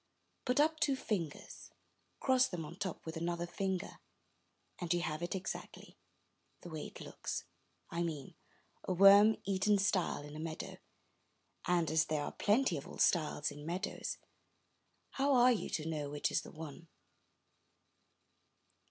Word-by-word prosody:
Put 250 +2 +2
up 315 +1 +3
two 290 -5 +3
fingers, 180 - -4 0.5
cross 260 -1 +4
them 170 -3 -5
on 150 - -8
the 180 - -17
top 190 -4 -4
with 160 0 -5
another 170 +1 -1
finger, 190 +1 -3 0.8
and 175 -2 -3
you 175 -1 +3
have 155 -1 -2
it 175 +2 -2
exactly, 190 - -6 0.3
— - - -43
the 175 - -9
way 155 -1 -4
it - - -11
looks, - - -4 0.5
I 170 - -1
mean, 155 -5 -3 0.3
— - - -39
a - - +2
worm 200 +4 +8
eaten 200 +1 +2
stile 195 -6 +1
in 145 0 -9
a - - -6
meadow; 160 0 -5 0.9
and 170 -3 +2
as 160 0 +4
there 150 -1 -1
are - - -3
plenty 210 - +2
of 140 - -7
old - - -5
stiles 150 -4 +2
in 145 0 -9
meadows, 175 +5 -3 0.9
how 275 0 +2
are 250 0 +7
you 230 - -1
to 155 0 -2
know 150 -3 -2
which 145 0 -1
is - - +2
the - - -11
one? 160 +1 -9
175 Hz, 160 wpm, -35 LUFS, 155-205 Hz, 0.9 s, worm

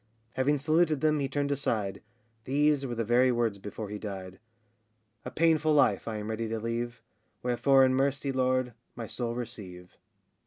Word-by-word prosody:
[Having 140 +3 +2
saluted 155 +1 +2
them, 155 -1 +2
he 135 -1 -1
turned 145 +1 -1
aside, 110 -8 -1 0.4
These 145 0 +2
were 120 - -4
the 115 - -1
very 125 +3 +4
words 115 -4 0
before 105 +1 -7
he 105 0 -5
died]: 95 -3 -7 0.9
A - - -3
painful 155 -1 +2
life 105 -9 +3
I 110 -1 -3
ready 110 +2 -3
am - - -5
to 115 0 -2
leave, 115 +1 -4 0.4
Wherefore, 130 +2 +4
in 130 - +2
mercy, 140 +1 0
Lord, 130 -1 0 0.2
my 115 - -5
soul 115 +2 -4
receive. 100 -7 -8
125 Hz, 165 wpm, -29 LUFS, 110-140 Hz, 0.9 s, very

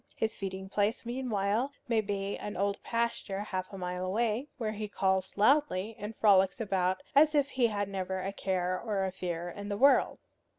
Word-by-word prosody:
His 220 - -1
feeding 190 -1 -5
place 205 +4 0
meanwhile 235 0 -1
may 230 -2 +2
be 200 -1 -2
an 210 - -6
old 200 +1 0
pasture 230 -4 -2
half 185 -3 -4
a 195 - -7
mile 180 0 -3
away, 225 +7 0
where 220 -3 -2
he 215 0 -4
calls 190 -2 0
loudly, 225 -3 +3
and 210 +2 -6
frolics 195 -1 +4
about 190 0 0
as 300 +2 +6
if 285 -1 +3
he 250 -3 +3
had 205 -2 -2
never 190 -1 -3
a 195 +1 -3
care 185 -2 -1
or 205 -4 -1
a 190 - -2
fear 175 -2 -4
in 205 +3 -7
the 200 - -2
world. 275 +5 +4
205 Hz, 185 wpm, -31 LUFS, 190-225 Hz, -, as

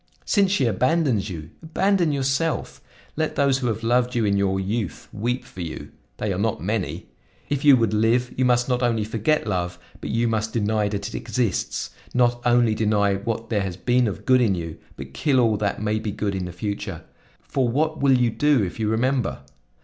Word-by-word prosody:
Since 200 -3 +3
she 150 -10 +2
abandons 125 - +1
you, 80 -3 -7
abandon 175 +1 +1
yourself! 140 +3 -1 0.3
Let 155 0 -1
those 140 -2 +2
who 125 - -1
have 110 0 -2
loved 125 +2 +2
you 115 -2 +2
in 100 -1 +2
your 95 -1 +1
youth 100 0 -3
weep 125 +4 -2
for 125 -8 -9
you! 80 -2 -6 0.3
They 105 -2 -1
are 90 - -3
not 110 +1 0
many. 105 +1 -2 0.4
If 145 -1 -1
you 145 -3 +7
would 115 -3 +1
live, 115 +3 +2
you 130 - +1
must 120 -1 +3
not 125 -1 0
only 115 -3 +1
forget 115 +8 0
love 90 -4 -2 0.2
but - - -6
you 115 +1 +1
must 110 -1 -1
deny 110 -1 +1
that 100 -1 -3
it - - -9
exists; 100 - -2 0.2
not 120 -1 +2
only 120 -2 +4
deny 105 -2 +2
what 115 +4 -4
there 105 -3 +2
has 95 -3 -4
been 125 +4 +2
of 100 - -5
good 130 -1 +5
in 105 -6 +2
you, 85 -2 -6 0.2
but 65 0 -9
kill 130 - +2
all 115 -3 +3
that 100 0 -2
may 105 0 0
be 110 0 -4
good 100 0 -2
in 95 -1 -3
the 90 - -6
future; 100 -1 -5 0.4
for 130 -3 -1
what 155 +5 0
will 135 -2 +5
you 120 -2 +2
do 145 -2 +3
if 90 +3 -5
you 110 -1 0
remember? 125 +1 0
115 Hz, 205 wpm, -23 LUFS, 100-125 Hz, 0.4 s, you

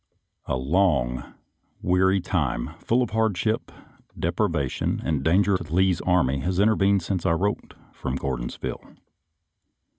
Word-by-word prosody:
A - - 0
LONG, 65 -4 +1 0.6
weary 95 +2 +3
time, 75 -10 -1
full 125 +2 +2
of 120 - -5
hardship, 110 0 0 0.5
depriva 75 -5 0
tion, - - -2
and 75 -4 0
danger 95 +5 +3
to 85 -3 -9
Lee's 95 -1 +3
army 85 -7 +2
has 90 +6 -1
intervened 100 -3 +3
since 90 -1 -2
I - - +2
wrote 100 +5 -2 0.2
from 65 - -4
Gordonsville. 65 -3 -4
90 Hz, 125 wpm, -25 LUFS, 70-100 Hz, 0.6 s, weary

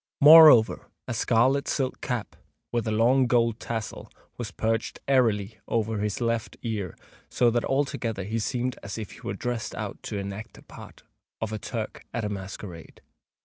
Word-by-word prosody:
Moreover, 150 -6 +8 0.2
a 130 - -2
scarlet 125 +5 +2
silk 130 -2 -2
cap, 120 -4 -3 0.4
with 120 -1 -1
a - - 0
long 125 +4 +3
gold 115 -2 +2
tassel, 115 -2 -5 0.2
was 120 -3 -5
perched 110 +4 -2
airily 110 -6 +2
over 110 -1 -1
his 105 -1 -2
left 115 -2 -2
ear; 105 -7 -4 0.3
so 120 -1 +3
that 120 0 0
altogether 125 -7 -1
he 110 +4 -2
seemed 125 +3 -2
as 100 +2 -6
if 110 -3 -6
he - - -13
were 100 - -4
dressed 120 +1 -4
out - - -6
to 105 - -5
enact 100 +2 -6
the - - -15
part - - -13 0.4
of 110 -1 -3
a 110 - -3
Turk - - -5
at 115 -3 -1
a - - -2
masquerade. 95 -3 -8
115 Hz, 170 wpm, -26 LUFS, 105-125 Hz, 0.4 s, Moreover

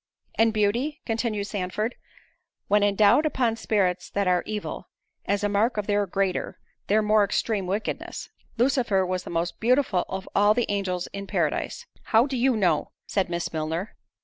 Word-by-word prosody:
"And 225 0 +3
beauty," 230 +8 0
continued 225 -3 -1
Sandford, 205 +3 -2 0.7
"when 210 0 +3
endowed 205 +6 +4
upon 250 -7 +1
spirits 190 -5 0
that 200 -1 -1
are 180 -1 +3
evil, 210 -1 -5 0.4
is 200 0 0
a - - +3
mark 210 +3 +1
of 210 - -1
their 205 -1 +1
greater, 190 0 -1 0.3
their 215 +2 +3
more 210 0 +4
extreme 200 0 -1
wickedness. 205 +3 -4 0.3
Lucifer 235 -6 +2
was 185 0 -3
the - - -7
most 170 +1 -2
beautiful 245 -5 +2
of 190 0 -5
all 205 +1 +4
the 240 - +1
angels 190 -3 -1
in 200 0 -6
Paradise"— - - -1 0.2
"How 225 +2 +4
do 275 -2 -3
you 250 -1 +2
know?" 190 -4 +1
said 195 -3 -1
Miss 170 -1 -3
Milner. 160 +6 -3
205 Hz, 165 wpm, -25 LUFS, 190-225 Hz, 0.7 s, endowed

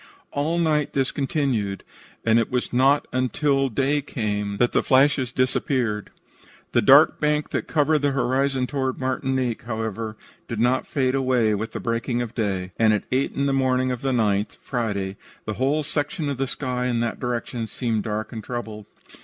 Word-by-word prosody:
All 155 +4 0
night 155 -3 +1
this 135 -1 +1
continued, 130 -9 -1 0.4
and 115 0 +5
it 115 - 0
was 125 -1 -2
not 135 +3 +3
until 135 +2 +1
day 140 +5 +1
came 105 -6 -3
that 120 +2 +2
the - - +2
flashes 130 -1 +3
disappeared. 125 -4 0 0.6
The - - +3
dark - - +6
bank 150 0 0
that - - -2
covered 155 0 +2
the 145 0 +1
horizon 135 0 +1
toward 130 -1 -2
Martinique, 130 -2 -1
however, 110 -1 -4 0.3
did 115 - -4
not 125 +3 +2
fade 130 -2 0
away 130 -5 +2
with 110 +2 -3
the - - -3
breaking 120 +1 -1
of 120 -2 -3
day, 95 -5 -2
and 110 -1 +5
at 105 - -2
eight 130 +2 +1
in 140 - 0
the 140 - +1
morning 130 -1 +2
of 125 - -4
the 135 - 0
9th 105 -4 +1
(Friday) 100 -6 -2 0.3
the 110 - -2
whole 145 +3 +2
section 145 +1 -2
of 140 - -2
the 135 0 -1
sky 125 -2 -2
in 120 -2 0
that 120 -1 -2
direction 120 -1 -3
seemed 115 -1 -1
dark 110 +1 -3
and 110 -2 -6
troubled. 110 -3 -6
125 Hz, 180 wpm, -24 LUFS, 110-135 Hz, 0.6 s, dark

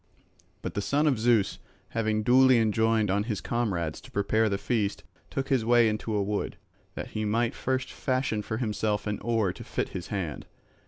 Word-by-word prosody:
But - - -4
the 100 - -1
son 145 +8 +1
of 135 -7 +2
Zeus 115 -3 +2 0.3
having 110 -1 0
duly 130 +2 +6
enjoined 110 -1 +2
on 100 +2 +1
his 110 -4 -2
comrades 95 -10 -2
to - - -14
prepare 110 +2 +1
the 100 - 0
feast 105 -2 -1 0.3
took 135 0 -3
his 130 -5 +2
way 120 0 +5
into 110 0 -2
a 100 - +2
wood, 105 +1 -2 0.4
that - - -5
he 110 - -3
might 115 +2 +1
first 130 0 -2
fashion 130 -5 -1
for 110 +1 -4
himself 105 -3 -1
an 105 -1 -2
oar 110 -5 0
to - - -10
fit - - -3
his 90 - -6
hand. 90 -9 -4
110 Hz, 190 wpm, -28 LUFS, 105-120 Hz, 0.4 s, duly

